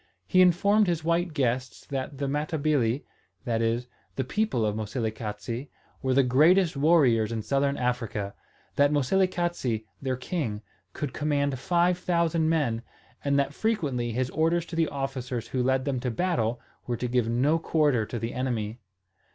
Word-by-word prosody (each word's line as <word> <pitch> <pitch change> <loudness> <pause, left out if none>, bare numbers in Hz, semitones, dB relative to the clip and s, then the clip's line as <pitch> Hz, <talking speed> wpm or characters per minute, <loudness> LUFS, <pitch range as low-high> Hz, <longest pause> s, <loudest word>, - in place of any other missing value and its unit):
He 185 - +4
informed 200 +4 +4
his 170 -2 0
white 170 +1 +1
guests 130 -3 -1
that 135 0 -4
the 140 0 -2
Matabili 145 -4 0 0.4
that 115 -2 0
is, 115 +2 0 0.3
the 130 - 0
people 210 - 0
of 105 -1 0
Moselekatse 110 +2 -4 0.3
were 130 -1 +1
the 135 - +5
greatest 160 +8 +4
warriors 140 -8 +4
in 110 -2 -3
Southern 140 +2 +1
Africa, 115 -5 -2 0.4
that 145 0 +4
Moselekatse, 170 - 0 0.2
their 130 -2 -1
king, 125 - -3 0.3
could 145 -3 -4
command 140 -3 0
five 175 +5 +2
thousand 170 -2 +1
men, 140 -9 +1 0.4
and 140 0 +2
that 140 0 +1
frequently 145 - -1
his 125 +2 -1
orders 165 +1 +1
to 170 - -8
the 165 -1 +2
officers 130 -4 -4
who 130 - -1
led 130 +1 +1
them 135 -3 -1
to 125 - -2
battle 120 -5 0 0.3
were 120 -1 -1
to 125 - -2
give 120 -2 +1
no 140 +8 +2
quarter 150 -8 +2
to 120 - -5
the 115 +1 -3
enemy. 120 -3 -2
135 Hz, 160 wpm, -27 LUFS, 120-160 Hz, 0.4 s, the